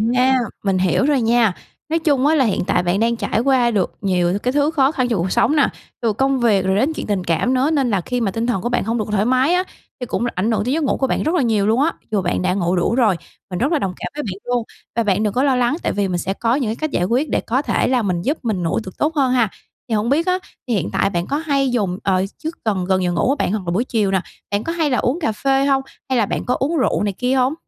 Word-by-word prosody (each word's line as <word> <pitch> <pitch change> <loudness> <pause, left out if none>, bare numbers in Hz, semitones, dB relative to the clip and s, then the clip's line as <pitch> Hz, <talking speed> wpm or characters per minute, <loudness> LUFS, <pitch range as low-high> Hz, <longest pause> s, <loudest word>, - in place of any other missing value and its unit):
À, 260 +1 +4 0.2
mình 195 -2 +1
hiểu 185 +8 +2
rồi 290 -3 +2
nha. 230 -3 +3 0.4
Nói 330 +1 +1
chung 285 -4 +2
á 315 - +4
là 270 -4 +3
hiện 210 - 0
tại 180 - +2
bạn 180 +3 0
đang 235 +1 +2
trải 220 - -1
qua 250 -1 +3
được 200 -5 0
nhiều 185 -1 +1
cái 250 - +1
thứ 290 +1 +2
khó 275 -3 +3
khăn 255 -5 0
trong 230 -6 0
cuộc 180 +2 -1
sống 305 - +2
nà, 290 - +4 0.3
từ 230 -3 +1
công 270 +4 +1
việc 210 -6 +2
rồi 190 0 +2
đến 270 +10 +1
chuyện - - -5
tình 200 -3 -1
cảm 175 +10 +1
nữa 260 +3 +2
nên 275 -5 +1
là 200 -4 +1
khi 245 +7 -3
mà 200 -4 0
tinh 230 +3 -2
thần 215 -7 0
của 240 - -2
bạn 245 - 0
hông 230 +3 -1
được 215 - -1
thoải 205 0 +1
mái 260 +6 +3
á, 360 +1 +2 0.4
thì 250 - -4
cũng 235 - -2
là 240 - -1
ảnh 205 +6 0
hưởng 220 - +1
tới 255 - 0
giấc 320 +1 0
ngủ 280 - +1
của 265 - 0
bạn - - -1
rất 320 +4 0
là 345 - +3
nhiều 215 -5 +1
luôn 230 +5 +3
á, 325 - +2 0.2
dù 205 - +1
bạn 175 0 -1
đã 180 0 +1
ngủ 180 -2 0
đủ 180 +6 +1
rồi, 225 -7 +3 0.3
mình 180 - -4
rất 270 +7 +1
là 320 - +2
đồng 190 -7 -2
cảm - - -5
với 295 - -3
bạn 195 -5 -5
luôn. 245 -1 0 0.3
Và 230 - +2
bạn 205 0 +1
đừng 210 -2 0
có 255 - +1
lo 270 -3 +3
lắng, 250 +4 +1
tại - - 0
vì 200 -1 0
mình 180 -2 -1
sẽ 190 +2 -2
có 230 +4 0
những 260 -6 -1
cái 220 - -2
cách 310 +4 -3
giải 175 - 0
quyết 255 +8 0
để - - 0
có 255 +4 0
thể - - 0
là 255 -1 +2
mình 180 -5 -1
giúp 285 - -1
mình 210 -6 -1
ngủ 165 - 0
tược 185 - -10
tốt 310 +2 0
hơn 270 -4 +2
ha. 235 -5 +2 0.4
Thì 225 - +1
hổng 215 +2 0
biết 310 +5 +2
á, 365 0 +2 0.3
thì 240 - 0
hiện 185 -6 0
tại - - +2
bạn 175 -2 -2
có 285 - -1
hay 280 -4 0
dùng 200 -7 0
ờ, 190 -1 +1
trước 320 +2 -5
gần 195 -5 0
gần 185 0 +1
giờ 175 - +1
ngủ 170 +7 +1
á 275 - +3
bạn - - -1
hoặc 210 -1 -1
là - - 0
buổi 200 +7 +1
chiều 210 -6 0
nà, 190 - +1 0.3
bạn 205 +1 0
có 330 - -3
hay 320 -3 0
là 250 - +1
uống 265 +8 0
cà 295 - 0
phê 270 +5 +1
hông? 270 -1 +2 0.3
Hay 260 - +1
là 220 - +3
bạn - - -3
có 250 - +1
uống 310 +5 0
rượu 260 - +1
này 205 -1 -1
kia 250 +6 -1
hông? 260 +1 +2
235 Hz, 315 wpm, -20 LUFS, 195-270 Hz, 0.4 s, À